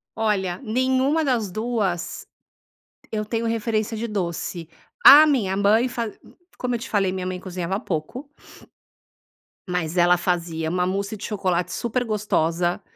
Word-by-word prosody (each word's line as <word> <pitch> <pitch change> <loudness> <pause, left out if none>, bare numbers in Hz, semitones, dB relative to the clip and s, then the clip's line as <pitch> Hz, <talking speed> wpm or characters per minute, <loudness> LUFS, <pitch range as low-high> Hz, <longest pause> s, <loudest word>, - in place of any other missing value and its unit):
Olha, 195 -5 -1
nenhuma 260 +6 +1
das 235 -8 0
2 205 -5 -2 0.9
eu 215 -1 -2
tenho 230 +2 -2
referência 225 -1 -1
de 230 +2 -3
doce. 175 -4 -4 0.4
A 300 +2 +11
minha 220 -10 +1
mãe 215 +5 +3
faz 235 -3 -4
c - - -28 0.4
como 250 -1 -2
eu - - -3
te - - -8
falei, 195 -3 +1
minha 185 -1 -4
mãe 185 0 -4
cozinhava 185 +1 -4
pouco 225 - -5 1.4
mas 180 -1 -2
ela 175 0 +5
fazia 170 -2 -2
uma 180 +1 0
mousse 200 +3 -3
de 205 - -7
chocolate 185 -4 -1
super 240 +1 -1
gostosa, 175 -5 0
200 Hz, 145 wpm, -23 LUFS, 180-230 Hz, 1.4 s, A